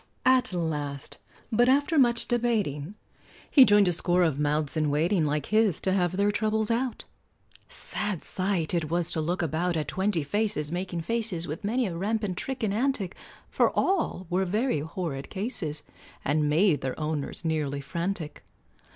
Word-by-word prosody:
At 255 -3 +4
last, 150 -6 -3 0.3
but 240 +3 +4
after 285 +3 +3
much 235 -3 +2
debating, 210 - -1 0.6
He 270 -4 +9
joined 205 -3 +5
a 180 - +2
score 175 +1 +2
of 155 -4 +1
mouths 150 0 0
in 155 -1 +1
waiting, 160 +4 +2
Like 145 -1 -1
his, 215 -5 +3
to 190 - 0
have 180 -1 +1
their 200 +1 +3
troubles 220 +1 0
out. 245 +1 -1 0.6
Sad 205 -6 -4
sight 185 -4 -1
it 165 -3 0
was 170 0 0
to 160 - +1
look 175 +3 -1
about 165 +3 0
At 150 -3 -2
twenty 190 -4 0
faces 180 -4 0
making 175 -1 -3
faces, 205 -3 -1
With 155 +6 -6
many 240 +5 +1
a 180 -5 -3
rampant 205 +1 -1
trick 265 +5 -4
and 205 -2 +1
antic, 225 -5 -1 0.4
For - - +3
all 345 - +1
were 180 +2 +1
very 210 - 0
horrid 155 -3 -5
cases, 190 - -3 0.4
And 150 +1 +2
made 160 +1 +3
their 130 +2 -4
owners 155 +1 -3
nearly 150 -3 -1
frantic. 170 +2 -4
180 Hz, 165 wpm, -27 LUFS, 155-215 Hz, 0.6 s, He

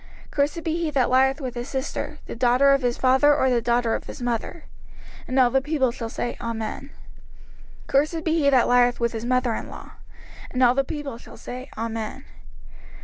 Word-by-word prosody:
05:027:022 - - -20
Cursed 295 +3 0
be 320 - -1
he 335 -2 -1
that 270 -4 +1
lieth 265 +2 +3
with 255 -4 -4
his 240 +2 -6
sister, 275 +2 -4
the - - -7
daughter 250 +3 +4
of 275 0 +3
his 245 -1 0
father, 265 +3 +4
or 265 -3 +2
the 240 -1 +2
daughter 235 0 +1
of - - -3
his - - -9
mother. 245 +7 -3 0.6
And 255 - -2
all 245 -2 +5
the 270 - +3
people 275 -3 +1
shall 230 -1 -6
say, 240 - -3
Amen. 225 -1 -4 0.9
05:027:023 - - -25
Cursed 305 +4 +1
be 320 - +1
he 280 -2 +4
that 260 -3 +4
lieth 245 0 +3
with 235 -1 +1
his 225 0 -4
mother 255 -1 +1
in - - -5
law. - - -10 0.6
And 255 0 0
all 245 0 +6
the 275 +1 +1
people 280 -4 -6
shall - - -13
say, 255 +2 -8
Amen. 225 +3 -4
255 Hz, 205 wpm, -24 LUFS, 240-280 Hz, 0.9 s, all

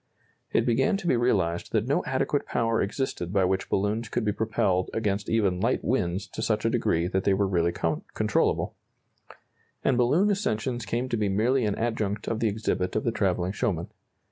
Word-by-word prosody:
It - - +2
began 135 +10 +2
to 195 - -9
be 170 - +3
realized 95 -8 0
that - - +2
no - - +1
adequate - - 0
power 115 -1 +1
existed 100 -5 -2
by 95 -2 +3
which 95 +1 -1
balloons 105 +4 0
could - - -1
be 105 - +2
propelled 105 -4 0
against 100 -2 -1
even 100 -5 +1
light 115 +6 +1
winds 95 -6 0
to - - -6
such - - 0
a - - +3
degree 85 +1 +1
that 95 +1 -1
they 100 - +3
were 100 - +2
really 85 -2 +1
controllable, 80 -2 0 1.1
and 125 -2 +2
balloon 165 +12 +3
ascensions 120 - -1
came 120 +4 -1
to 120 - 0
be 105 -2 0
merely 115 +6 +2
an 105 - 0
adjunct 105 -3 -2
of 115 - -1
the 115 - +2
exhibit 100 -3 -1
of 110 - 0
the 115 - +1
travelling 95 -4 0
showman. 95 -6 -2
105 Hz, 190 wpm, -27 LUFS, 95-120 Hz, 1.1 s, be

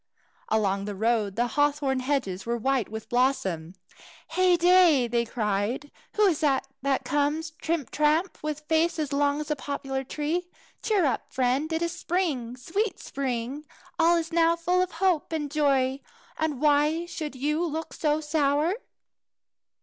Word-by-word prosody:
Along 200 -2 +1
the 205 -1 -4
road 215 -1 0
the 240 +2 +1
hawthorn 285 +1 +1
hedges 255 -9 -1
were 235 +2 -1
white 265 0 0
with 220 0 -7
blossom. 190 -10 0 0.5
"Heyday!" 355 -6 +5
they 235 0 0
cried, 220 +5 -2 0.2
"who 425 - +4
is 345 -7 +2
this 285 -4 +2 0.2
that 275 0 0
comes 295 +2 0
trimp 320 -2 -3
tramp, 310 +5 +1
with 305 0 -3
a - - -33
face 325 +2 +1
as 300 -3 -2
long 285 +1 +2
as 300 0 -4
a - - +2
poplar 270 -1 -4
tree? 315 +6 -2 0.3
Cheer 415 -6 +2
up, 270 - -2
friend! 260 +5 0
It 320 +1 0
is 340 - -1
spring! 305 -9 -2
sweet 390 - -2
spring! 260 +1 -3 0.4
All 335 +1 +5
is 330 0 -3
now 335 0 +4
full 355 +2 +1
of 365 0 -2
hope 350 -2 +1
and 300 -3 -2
joy, 275 -3 +2 0.4
and 310 -4 -2
why 300 +3 +3
should 310 -4 -6
you 300 +5 0
look 320 -1 -4
so 300 0 0
sour?" 300 +2 +1
290 Hz, 155 wpm, -26 LUFS, 255-325 Hz, 0.5 s, Heyday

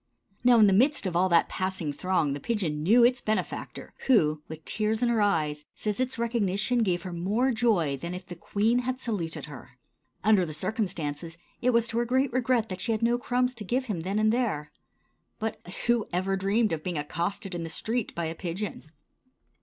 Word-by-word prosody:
Now, 245 -1 +6
in 220 - +7
the 195 - +4
midst 255 +5 +3
of 180 -3 -2
all 185 +2 +3
that 170 -1 +4
passing 185 -5 -3
throng 170 -2 0
the 145 - -4
pigeon 170 -7 -1
knew 225 +9 +5
its 245 +1 +4
benefactor, 215 0 -3
who, 155 - +4
with 160 0 -9
tears 220 +2 0
in 240 - +3
her 230 -2 +2
eyes, 155 -7 +1
says 210 0 -3
its 255 -1 -1
recognition 230 0 +1
gave 180 -5 0
her 185 - -6
more 210 +10 +1
joy 210 - +1
than 170 +6 -5
if 180 0 -8
the 175 - -8
queen 215 +7 +1
had 255 +1 -2
saluted 170 - -3
her. 145 -5 -12 0.5
Under 210 -2 +5
the 155 -3 -4
circumstances, 165 -4 -3 0.2
it 250 - +3
was 235 -1 +3
to 230 - 0
her 240 - +1
great 260 +1 +1
regret 250 -2 +2
that 185 -1 -5
she 230 - -1
had 220 +1 -2
no 240 +1 +3
crumbs 250 0 0
to 230 -3 -7
give 250 +6 -1
him 210 -8 -3
then 190 +5 -2
and 215 +1 +3
there. 210 -12 -1 0.7
But 220 -1 -3 0.3
who 240 -2 +2
ever 190 +2 0
dreamed 200 +2 +1
of 155 -1 -3
being 180 -3 -3
accosted 175 +6 -3
in 175 - -3
the 165 - -5
street 225 +7 -2
by 170 - -2
a 160 - -3
pigeon? 175 -1 -5
200 Hz, 205 wpm, -27 LUFS, 170-235 Hz, 0.7 s, in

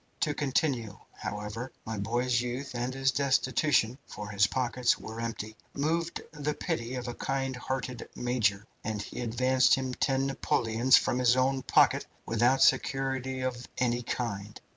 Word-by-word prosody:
To 150 -3 +2
continue, 130 -7 0 0.2
however, 105 +5 -5
my 110 -2 -4
boy's 120 +3 +1
youth 125 +3 -4
and 120 +1 -2
his 135 0 +1
destitution 140 -2 +2
for 105 0 -7
his 100 -1 +3
pockets 125 +1 +1
were 110 +1 -7
empty 110 -2 -4 0.2
moved 165 +4 -1
the 150 -1 -2
pity 115 0 -3
of 125 -1 -4
a 120 - -3
kind 135 +1 -2
hearted 125 0 -4
major, 115 -5 +1 0.2
and 110 -2 -2
he 120 - -6
advanced 130 +2 +3
him 130 -1 -3
ten 135 +1 +1
Napoleons 120 -2 +3
from 125 - +1
his 125 -1 +5
own 130 +1 +2
pocket - - +3 0.2
without 120 +4 +3
security 130 -1 +1
of 125 -1 -3
any 120 -1 +1
kind. 105 -4 -4
125 Hz, 150 wpm, -29 LUFS, 115-135 Hz, 0.2 s, his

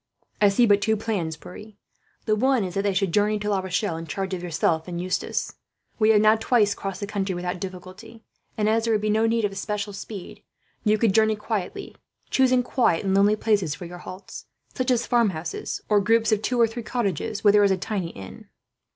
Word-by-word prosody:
"I 205 - +6
see 220 +5 +4
but 205 -2 +4
two 220 +1 +1
plans, 180 -8 -3
Pierre. 210 +6 -11 0.5
The 215 - +2
one 255 +1 +2
is 180 -2 -4
that 195 - 0
they 200 -1 0
should 190 -3 0
journey 210 +1 +2
to 210 0 -2
La 195 - +1
Rochelle, 185 -1 -2
in 165 0 -7
charge 190 +5 -3
of 180 - -3
yourself 165 -1 0
and 175 -1 -4
Eustace. 185 +1 -2 0.5
We 215 0 +4
have 210 -2 +5
now 215 +1 +5
twice 220 -2 +2
crossed 195 -1 -6
the - - -1
country 200 -2 -2
without 180 0 -4
difficulty 190 +5 -9 0.3
and, 210 -1 +1
as 225 +1 +2
there 225 -1 +2
would 210 - 0
be 215 0 0
no 220 +1 +2
need 230 -1 +1
of 205 - -1
especial 205 +1 -4
speed, 195 -1 -8 0.4
you 215 -1 +3
could 215 -2 +2
journey 220 0 +3
quietly; 210 -3 -4 0.4
choosing 255 -1 +3
quiet 240 -9 +1
and 190 - +1
lonely 200 +2 +4
places 205 -8 0
for 175 - -9
your 175 +1 -9
halts, 185 +2 -10 0.3
such 255 0 -2
as 245 -2 +2
farmhouses, 190 -10 -1
or 210 -1 +3
groups 225 +2 +2
of 215 -1 +2
two 245 +2 -1
or 230 - +7
three 225 +2 -5
cottages 210 - -2
where 205 -1 +6
there 205 0 +5
is 200 - +4
a 190 - +2
tiny 185 -2 -3
inn." 95 - -11
205 Hz, 220 wpm, -24 LUFS, 185-220 Hz, 0.5 s, or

